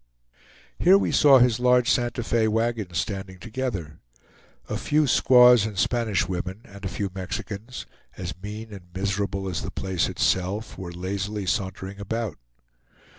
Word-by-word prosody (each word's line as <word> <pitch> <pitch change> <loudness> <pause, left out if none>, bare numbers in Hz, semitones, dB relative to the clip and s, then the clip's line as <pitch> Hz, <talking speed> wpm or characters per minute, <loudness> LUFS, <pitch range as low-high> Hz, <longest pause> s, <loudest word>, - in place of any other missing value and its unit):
Here 185 +3 +6
we - - 0
saw 140 -2 +7
his 125 -2 +3
large 125 -1 +4
Santa 120 0 +1
Fe 115 -1 +1
wagons 110 -5 -1
standing 95 -2 -3
together. 105 - -5 0.7
A - - -3
few 150 +1 +1
squaws 125 -3 +6
and 105 -2 -4
Spanish 115 -2 +1
women, 90 +3 -4
and 100 0 -13
a - - -1
few 100 0 -3
Mexicans, 100 +5 -6 0.3
as - - -4
mean 105 +2 -7
and 95 -3 -11
miserable 100 0 -2
as 90 -4 -3
the - - -5
place 95 -3 -1
itself, 95 +5 -1
were 90 -2 -7
lazily 100 +3 -4
sauntering 95 +1 -3
about. 105 -3 -4
105 Hz, 145 wpm, -25 LUFS, 95-120 Hz, 0.7 s, saw